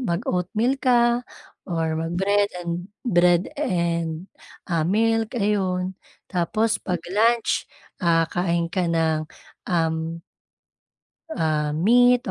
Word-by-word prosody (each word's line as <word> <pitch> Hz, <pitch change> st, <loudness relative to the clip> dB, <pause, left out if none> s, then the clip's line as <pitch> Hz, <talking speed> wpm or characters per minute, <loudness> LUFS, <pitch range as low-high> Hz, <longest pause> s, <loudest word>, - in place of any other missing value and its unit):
mag-oatmeal 215 Hz, +5 st, -1 dB
ka 240 Hz, -1 st, +3 dB, 0.5 s
or 160 Hz, -2 st, -1 dB
mag-bread 195 Hz, +5 st, +1 dB, 0.2 s
and 170 Hz, +2 st, -4 dB, 0.2 s
bread 175 Hz, -5 st, +4 dB, 0.2 s
and 170 Hz, -, -1 dB, 0.6 s
milk 225 Hz, +3 st, +1 dB
ayun. 190 Hz, -3 st, 0 dB, 0.4 s
Tapos 215 Hz, +5 st, 0 dB
'pag 180 Hz, -3 st, -3 dB
lunch, 230 Hz, +2 st, +2 dB, 0.3 s
ah, 165 Hz, -3 st, +3 dB
kain 170 Hz, -1 st, 0 dB
ka 180 Hz, -2 st, 0 dB
ng, 160 Hz, -2 st, +1 dB, 0.5 s
um 165 Hz, -1 st, -1 dB, 1.1 s
ah, 150 Hz, -2 st, 0 dB
meat 245 Hz, +8 st, +4 dB
180 Hz, 95 wpm, -23 LUFS, 165-220 Hz, 1.1 s, bread